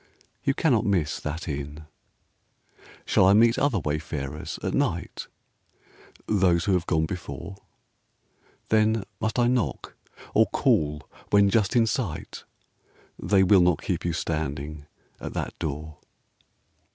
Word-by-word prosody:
You 135 - +1
cannot 125 -9 +2
miss 95 -9 0
that 80 +3 -5
inn. 75 +1 -5 1.2
Shall - - +4
I 95 - +6
meet 115 +3 +5
other 140 -5 +2
wayfarers 75 -2 -4
at - - -1
night? 115 -12 -2 1.0
Those 90 -5 +2
who 100 - +2
have 90 -1 0
gone 80 -1 +2
before. 85 0 -6 1.1
Then 110 -1 +3 0.2
must 110 +2 -2
I 120 - +4
knock, 120 - -1 0.4
or - - +5
call 75 -1 +1 0.2
when 100 -1 +4
just 105 0 +2
in 115 -2 +5
sight? 105 - -4 0.8
They 100 -2 +3
will 95 0 +6
not 90 -3 +2
keep - - -2
you 85 - 0
standing 75 -2 -4 0.3
at - - -7
that - - -3
door. 75 -1 -5
90 Hz, 125 wpm, -26 LUFS, 75-110 Hz, 1.2 s, I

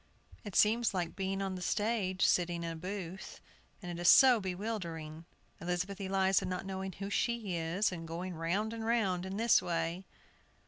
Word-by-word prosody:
It 205 -5 -8
seems 225 0 +3
like 175 -2 -2
being 195 0 -2
on 190 -1 -2
the 185 - -6
stage, 205 -1 0
sitting 175 -1 +1
in 165 - -3
a - - -6
booth, 185 +1 -6 0.4
and 175 - -5
it 175 0 -5
is 175 - +5
so 255 -3 +8
bewildering, 175 -5 -5 0.3
Elizabeth 180 +3 -3
Eliza 190 0 +2
not 185 +1 -3
knowing 190 0 -4
who 195 +2 -6
she 225 -4 -1
is, 170 +6 0
and 165 -2 -6
going 175 +3 -5
round 185 +7 -1
and 225 -1 -5
round 195 -6 0
in 190 +1 -4
this 230 0 +4
way." 170 +2 -2
190 Hz, 175 wpm, -33 LUFS, 175-205 Hz, 0.4 s, so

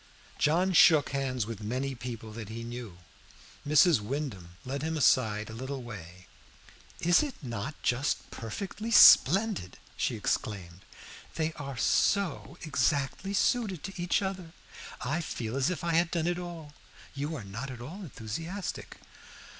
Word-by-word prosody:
John 175 +5 +2
shook 155 -4 +6
hands 130 -4 -1
with 115 -2 -7
many 130 +6 -2
people 115 -3 -7
that 110 -1 -8
he 115 +1 -6
knew. 120 -6 -7 0.7
Mrs. 150 - +6
Wyndham 105 - -5
led 135 +2 -3
him 160 +1 -2
aside 110 -5 +3
a 110 - -8
little 130 +3 -5
way. 90 -6 -10 0.8
"Is 175 0 +5
it 290 -3 -3
not 120 +4 -5
just 130 +4 0
perfectly 195 - -5
splendid?" 195 - +6 0.2
she - - -1
exclaimed. 95 -4 -3 0.5
"They 160 0 -1
are 140 -4 -7
so 185 - +1
exactly 145 +6 0
suited 205 -6 +1
to 195 - -6
each 175 +3 +1
other. 185 -4 -5 0.5
I 150 +7 -1
feel 120 -6 -4
as 135 +3 +2
if 180 -4 -4
I 170 -1 0
had 170 +1 +3
done 170 -2 -1
it 175 0 0
all. 170 -4 -8 0.4
You 145 +3 -3
are 130 - -6
not 110 +8 -6
at 125 -2 -8
all 160 +12 -8
enthusiastic." 165 - -6
140 Hz, 145 wpm, -29 LUFS, 115-170 Hz, 0.8 s, shook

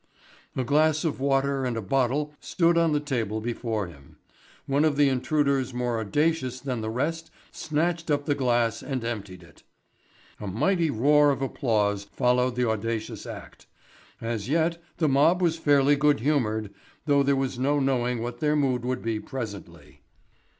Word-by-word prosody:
A 130 - 0
glass 155 +3 +2
of 155 - -1
water 135 0 +1
and 125 -2 -2
a - - -1
bottle 135 +6 0
stood 170 -1 +1
on 165 -1 +3
the 150 - +2
table 120 -7 -2
before 115 -2 -3
him. 70 -6 -15 0.5
One 140 +2 +1
of 155 -2 +2
the 145 -1 +5
intruders 135 -1 0
more 120 -2 -1
audacious 130 +3 0
than 130 -4 -3
the 110 - -3
rest 160 +8 -2 0.2
snatched 165 +2 -2
up 145 -1 +1
the 145 - +2
glass 120 -4 +1
and 130 -4 -4
emptied 100 -6 -5
it. 85 -1 -19 0.8
A 105 - -6
mighty 160 - +1
roar 145 +4 +4
of 135 -1 0
applause 105 -6 0
followed 125 +3 +1
the 125 -1 +1
audacious 110 0 -3
act. - - -10 0.5
As 115 -1 -4
yet 165 +2 +1 0.2
the 160 - +2
mob 150 +6 +4
was 170 -2 +1
fairly 145 -2 +4
good 145 -2 +3
humoured, 110 -7 0 0.3
though 145 -2 +3
there 140 0 +2
was 135 -2 -2
no 145 +3 +2
knowing 125 -3 0
what 120 0 -5
their 150 0 +1
mood 130 -4 +1
would 125 0 -2
be 115 -1 -1
presently. 105 - -8
130 Hz, 165 wpm, -26 LUFS, 115-150 Hz, 0.8 s, the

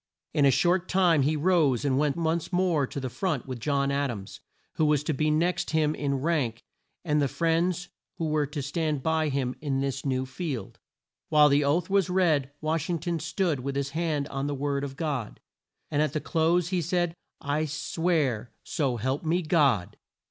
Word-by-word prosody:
In 145 - +3
a - - +7
short 175 +7 +2
time 180 -5 +4
he 150 +4 +2
rose 150 -5 +2
and 135 -2 +2
went 145 +1 +1
once 165 +1 -1
more 175 -6 +2
to 140 - -5
the 130 - -3
front 150 0 -2
with 130 -2 -6
John 140 +2 0
Ad 140 0 0
ams, 100 -5 -7 0.4
who 155 - +3
was 150 -1 +2
to 155 - -1
be 155 +2 +1
next 170 +4 +1
him 155 -1 +2
in 140 -2 -1
rank, 135 -5 -1 0.4
and 150 -2 +2
the 140 - +2
friends 170 +4 0 0.3
who 165 - -2
were 150 -2 +1
to 145 0 -5
stand 150 -1 -1
by 160 -1 +1
him 130 -2 -1
in 140 -3 -1
this 135 -1 -2
new 130 -1 0
field. 130 - -5 0.5
While 150 -1 +6
the 145 +1 +3
oath 160 +5 +1
was 195 -2 +2
read 160 -7 +2
Wash 155 +1 -1
ing 175 - +1
ton 170 +1 -2
stood 165 -1 -1
with 135 +2 -4
his 140 0 -2
hand 155 -3 -1
on 135 +1 -3
the 145 - -2
Word 140 0 -1
of 135 -1 -5
God, 140 -9 -3 0.5
and 150 -1 +2
at 155 - 0
the 155 - 0
close 170 +2 +1
he 180 -2 0
said, 175 +1 0 0.3
"I 145 +2 -1
swear 150 -6 -1
so 140 -8 -1
help 130 +5 -2
me 170 +3 +1
God!" 140 - +2
150 Hz, 200 wpm, -27 LUFS, 140-165 Hz, 0.5 s, a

